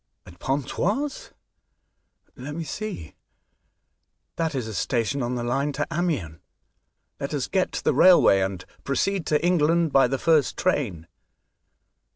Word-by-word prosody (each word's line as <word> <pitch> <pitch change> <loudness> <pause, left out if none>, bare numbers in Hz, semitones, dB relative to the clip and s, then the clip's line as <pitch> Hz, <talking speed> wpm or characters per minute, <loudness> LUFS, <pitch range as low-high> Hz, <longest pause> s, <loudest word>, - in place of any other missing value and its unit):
" - - -53
At 90 -1 -15
Pontoise? 195 - -2 1.0
Let 145 +4 -7
me 165 - -4
see; 195 - -6 1.2
that 165 -3 -2
is 125 -4 -3
a 110 - -6
station 120 +8 -1
on 120 +1 -2
the 120 - -3
line 140 +4 -1
to 145 - -1
Amiens. 150 - -2 0.8
Let 140 +2 -3
us 135 - -1
get 190 -1 0
to - - -4
the - - +2
railway, 175 - +6
and 95 -1 -3 0.2
proceed 190 +6 -1
to 150 +2 +1
England 170 -2 +2
by 135 -2 +5
the 135 +2 -1
first 155 -1 +2
train." 115 - -1
145 Hz, 145 wpm, -24 LUFS, 120-170 Hz, 1.2 s, railway